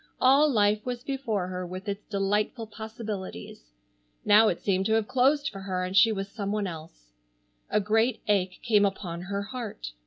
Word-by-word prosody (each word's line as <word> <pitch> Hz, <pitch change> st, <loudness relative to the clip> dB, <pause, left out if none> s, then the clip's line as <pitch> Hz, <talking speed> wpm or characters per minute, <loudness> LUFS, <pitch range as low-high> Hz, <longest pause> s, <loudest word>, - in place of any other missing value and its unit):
All 275 Hz, +4 st, +5 dB
life 210 Hz, -2 st, +2 dB
was 245 Hz, -1 st, -4 dB
before 240 Hz, -10 st, -2 dB
her 185 Hz, 0 st, -4 dB
with 185 Hz, +2 st, -7 dB
its 200 Hz, +1 st, -4 dB
delightful 210 Hz, +3 st, -1 dB
possibilities. 215 Hz, -, -7 dB, 0.6 s
Now 215 Hz, +2 st, +7 dB
it 175 Hz, -, 0 dB
seemed 190 Hz, -1 st, 0 dB
to 220 Hz, -, +1 dB
have 220 Hz, -1 st, +1 dB
closed 280 Hz, +3 st, +2 dB
for 195 Hz, -, -8 dB
her 190 Hz, -1 st, -3 dB
and 185 Hz, +1 st, -4 dB
she 220 Hz, +3 st, +6 dB
was 195 Hz, -2 st, -3 dB
some 200 Hz, -1 st, -4 dB
one 210 Hz, -1 st, -1 dB
else. 155 Hz, -, -9 dB, 0.6 s
A -, -, +2 dB
great 225 Hz, +4 st, +1 dB
ache 190 Hz, -3 st, +1 dB
came 210 Hz, -4 st, +4 dB
upon 185 Hz, -4 st, -2 dB
her 200 Hz, +2 st, -3 dB
heart. 220 Hz, -, -6 dB
205 Hz, 180 wpm, -27 LUFS, 190-225 Hz, 0.6 s, Now